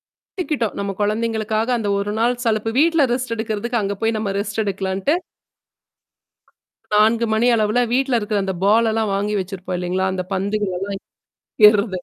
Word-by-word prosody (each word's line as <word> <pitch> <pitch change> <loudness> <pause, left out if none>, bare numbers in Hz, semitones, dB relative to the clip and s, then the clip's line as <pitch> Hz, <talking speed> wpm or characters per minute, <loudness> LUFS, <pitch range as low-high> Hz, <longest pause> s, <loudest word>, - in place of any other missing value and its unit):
எடுத்துக்கிட்டோம். 300 - -4
நம்ம 200 -1 -3
குழந்தைங்களுக்காக 220 +1 -1
அந்த 205 -2 -2
1 205 +1 -2
நாள் 240 +2 +2
சலிப்பு 225 0 0
வீட்ல 325 -2 +4
ரெஸ்ட் 250 -2 -2
எடுக்கிறதுக்கு 220 +1 -2
அங்க 200 0 -1
போய் 225 0 +1
நம்ம 205 -2 -2
ரெஸ்ட் 205 +1 -2
எடுக்கலான்ட்டு. 195 - -1 1.8
4 225 +2 +3
மணி 220 +3 +2
அளவுல 220 +2 +2
வீட்ல 260 -1 +2
இருக்கிற 210 -1 -1
அந்த 190 -1 -2
பால் 225 +3 +4
எல்லாம் 220 -2 0
வாங்கி 205 +2 -1
வச்சிருப்போம் 185 -1 -4
இல்லேங்களா! 185 +1 -1
அந்த 185 - -2
பந்துகள 200 +1 -1 1.0
எல்லாம் 200 -4 -1
215 Hz, 145 wpm, -20 LUFS, 200-230 Hz, 1.8 s, வீட்ல